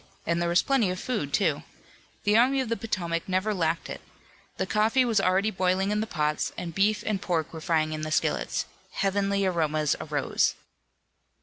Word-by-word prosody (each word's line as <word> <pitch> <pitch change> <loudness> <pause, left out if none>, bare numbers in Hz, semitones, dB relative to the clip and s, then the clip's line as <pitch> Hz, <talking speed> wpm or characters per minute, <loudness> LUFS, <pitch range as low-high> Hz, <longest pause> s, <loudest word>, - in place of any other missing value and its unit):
And 170 +1 0
there 170 - +1
was 175 +1 +3
plenty 265 -8 +2
of 180 0 -3
food, 215 - -2
too. 160 -7 +1 0.6
The 210 0 +3
Army 260 +4 +4
of 260 -4 -2
the 230 - +1
Potomac 175 -7 -3
never 190 +3 +1
lacked 165 -3 -1
it. - - -7 0.6
The - - 0
coffee 225 +5 +2
was 230 -3 +2
already 190 +4 +2
boiling 190 +1 +1
in 210 - +1
the 220 - -2
pots, 150 -5 -1
and 175 -2 -5
beef 210 +4 +2
and 210 -3 -1
pork 165 -4 -1
were 160 - -7
frying 155 -2 +1
in 155 - -4
the 155 - -3
skillets. 155 - 0 0.3
Heavenly 200 0 +1
aromas 155 -4 +1
arose. - - 0
185 Hz, 185 wpm, -27 LUFS, 165-215 Hz, 0.6 s, Army